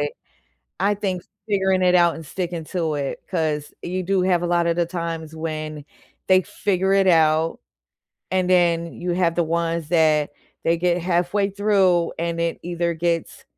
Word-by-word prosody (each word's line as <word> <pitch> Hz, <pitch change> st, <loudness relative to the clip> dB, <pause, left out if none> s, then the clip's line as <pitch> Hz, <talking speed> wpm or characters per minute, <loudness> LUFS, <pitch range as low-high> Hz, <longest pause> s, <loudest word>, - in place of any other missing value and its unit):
it. 145 Hz, 0 st, -1 dB, 0.7 s
I 205 Hz, +1 st, +2 dB
think 190 Hz, -3 st, -3 dB, 0.3 s
figuring 190 Hz, -2 st, +2 dB
it 180 Hz, 0 st, +4 dB
out 175 Hz, -2 st, +4 dB
and 165 Hz, -1 st, -9 dB
sticking 175 Hz, -1 st, -4 dB
to 165 Hz, -2 st, -2 dB
it, 140 Hz, -1 st, -3 dB
'cause 155 Hz, -4 st, -1 dB
you 185 Hz, +1 st, -3 dB
do 190 Hz, +1 st, +1 dB
have 180 Hz, -2 st, +2 dB
a -, -, 0 dB
lot 170 Hz, 0 st, +2 dB
of 170 Hz, -, +2 dB
the 175 Hz, -1 st, +1 dB
times 165 Hz, -2 st, -5 dB
when 155 Hz, -2 st, -5 dB, 0.4 s
they 185 Hz, 0 st, +5 dB
figure 190 Hz, 0 st, -1 dB
it 195 Hz, -1 st, +4 dB
out, 160 Hz, -1 st, +3 dB, 0.7 s
and 185 Hz, -1 st, +1 dB
then, 170 Hz, -2 st, +2 dB
you 175 Hz, 0 st, -1 dB
have 175 Hz, -1 st, +1 dB
the 170 Hz, -, +1 dB
ones 165 Hz, -1 st, -1 dB
that 155 Hz, -3 st, +3 dB, 0.3 s
they 165 Hz, +1 st, +3 dB
get 175 Hz, 0 st, +1 dB
halfway 180 Hz, +3 st, +1 dB
through 195 Hz, -4 st, +2 dB
and 170 Hz, 0 st, -2 dB
it 170 Hz, 0 st, -1 dB
either 170 Hz, 0 st, -1 dB
gets 165 Hz, 0 st, -2 dB
170 Hz, 170 wpm, -22 LUFS, 165-185 Hz, 0.7 s, they